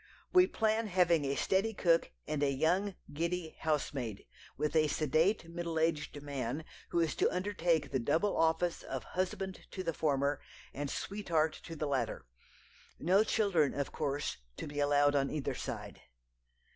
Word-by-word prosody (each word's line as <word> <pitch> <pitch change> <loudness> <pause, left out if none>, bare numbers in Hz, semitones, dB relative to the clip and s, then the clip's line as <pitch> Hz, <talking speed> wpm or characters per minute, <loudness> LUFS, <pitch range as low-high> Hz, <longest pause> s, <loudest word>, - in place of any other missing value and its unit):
We 365 0 +7
plan 220 -3 +1
having 175 -5 +3
a 140 0 0
steady 200 +7 +1
cook 170 -3 +3 0.2
and 150 -2 -2
a 145 - +3
young, 175 +8 +1 0.2
giddy 170 +1 -2
housemaid, 140 -8 -2 0.3
with 150 +2 -1
a 155 -1 +5
sedate, 160 +6 +2
middle 170 -1 -4
aged 160 -2 0
man, 140 +1 -3 0.2
who 170 - +1
is 165 -2 +2
to - - +3
undertake 175 -6 0
the 130 - +1
double 160 - +1
office 165 +1 +2
of - - -5
husband 185 +1 -3
to 185 - -5
the 165 -2 -1
former, 140 -2 +1 0.3
and 145 0 -3
sweetheart 165 -6 0
to 165 - -7
the 155 - -2
latter. 135 -5 -1 0.7
No 190 +6 +4
children, 195 -10 +2
of 140 -1 -2
course, 145 -1 -2 0.2
to - - -5
be 145 0 -5
allowed 145 0 +4
on 135 -1 +2
either 150 -3 -2
side." - - -6
160 Hz, 160 wpm, -33 LUFS, 145-180 Hz, 0.7 s, We